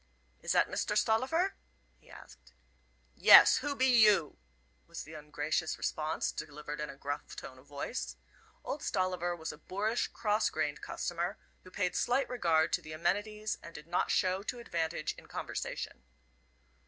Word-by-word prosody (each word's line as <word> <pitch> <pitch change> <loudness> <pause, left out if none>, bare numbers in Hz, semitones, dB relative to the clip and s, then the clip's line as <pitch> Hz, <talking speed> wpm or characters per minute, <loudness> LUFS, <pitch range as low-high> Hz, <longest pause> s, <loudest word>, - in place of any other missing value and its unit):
"Is - - 0
that - - +4
Mister - - -2
Stollifer?" 325 - +2 0.5
he - - -23
asked. - - -15 0.6
"Yes; - - +9
who 290 -1 -2
be 260 - +2
you?" 215 - +5 0.5
was - - -7
the 155 - -12
ungracious 150 +1 -2
response, 155 0 -1
delivered 150 0 -7
in 150 - -3
a 140 - -8
gruff 145 +1 -5
tone 130 0 -9
of 130 - -20
voice. 145 - -4 0.5
Old 290 - -4
Stolliver 180 -3 -1
was 160 -1 -5
a 150 - -12
boorish, 210 +8 -1
cross 210 -1 +1
grained 145 0 -2
customer, 175 +4 -3 0.3
who 185 - -13
paid 185 -1 -1
slight 260 +3 +1
regard 165 -10 +2
to - - +2
the 155 - -9
amenities, 205 +6 -1
and 170 - -11
did 150 - -9
not 175 +2 0
show 185 +1 +2
to 230 +4 -4
advantage 165 -8 -2
in - - -17
conversation. - - -5
175 Hz, 155 wpm, -32 LUFS, 155-215 Hz, 0.6 s, Yes